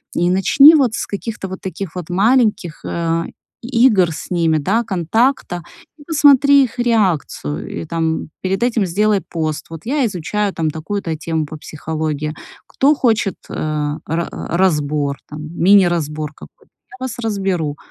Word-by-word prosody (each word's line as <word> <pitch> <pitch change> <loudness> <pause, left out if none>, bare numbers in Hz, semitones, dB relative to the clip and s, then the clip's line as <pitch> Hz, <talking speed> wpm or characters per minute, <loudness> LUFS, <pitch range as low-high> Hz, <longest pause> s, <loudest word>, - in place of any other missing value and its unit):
И 175 +1 +2
начни 275 - +7
вот 255 -7 +2
с - - -2
каких-то 205 0 -5
вот 190 0 -8
таких 190 -2 -6
вот 180 -2 -6
маленьких, 200 -3 +1
э, 165 0 -1 0.4
и 240 0 +3
игр 185 -8 +3
с 155 - -7
ними, 165 -3 +2
да, 200 +11 +1
контакта, 195 - 0 0.3
и 290 - -15
посмотри 285 -3 +5
их 245 - -10
реакцию, 185 - 0 0.2
и, - - -6
там, 160 0 -2
перед 190 +3 -1
этим 230 -4 +1
сделай 205 +3 +1
пост: 155 -3 -4
"Вот 165 -1 -8
я 275 +1 +1
изучаю, 205 +1 -2
там, 160 -1 -1
такую-то 165 +2 -4
тему 160 0 -2
по 155 - -9
психологии. 155 0 -4 0.3
Кто 280 +3 +3
хочет, 220 -7 +1
э, - - -7 0.5
ра 165 +2 -2
разбор, 150 -5 0
там, 150 0 -7
мини-разбор 170 -5 +2
какой-то, - - -16 0.2
я 255 - -12
вас 260 -3 -4
разберу". 190 -9 -2
185 Hz, 150 wpm, -18 LUFS, 160-225 Hz, 0.5 s, начни